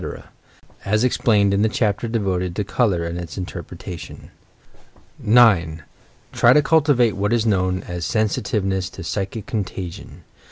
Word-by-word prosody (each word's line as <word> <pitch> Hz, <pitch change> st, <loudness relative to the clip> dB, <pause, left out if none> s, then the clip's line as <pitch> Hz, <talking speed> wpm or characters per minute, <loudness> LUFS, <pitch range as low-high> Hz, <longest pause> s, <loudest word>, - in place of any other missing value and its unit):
— -, -, -30 dB
as 105 Hz, +3 st, +1 dB
explained 105 Hz, -5 st, +2 dB
in 100 Hz, -, +1 dB
the 110 Hz, -, +3 dB
chapter 110 Hz, 0 st, -1 dB
devoted 95 Hz, -6 st, -2 dB
to 105 Hz, -, -1 dB
"Col 105 Hz, +3 st, +1 dB
our 85 Hz, -2 st, -2 dB
and 85 Hz, +1 st, -4 dB
Its 85 Hz, -2 st, -8 dB
Interpretation." 90 Hz, -1 st, -8 dB, 0.9 s
9. 100 Hz, -9 st, +4 dB, 0.5 s
Try -, -, +5 dB
to 150 Hz, -, +4 dB
cultivate 145 Hz, -, +3 dB
what 100 Hz, +2 st, -1 dB
is 115 Hz, -1 st, +1 dB
known 95 Hz, -3 st, 0 dB
as 90 Hz, 0 st, -6 dB
Sensitiveness 100 Hz, -3 st, -1 dB
to -, -, -10 dB
"psychic 100 Hz, +5 st, -4 dB
contagion." 95 Hz, -7 st, -6 dB
100 Hz, 145 wpm, -21 LUFS, 90-110 Hz, 0.9 s, Try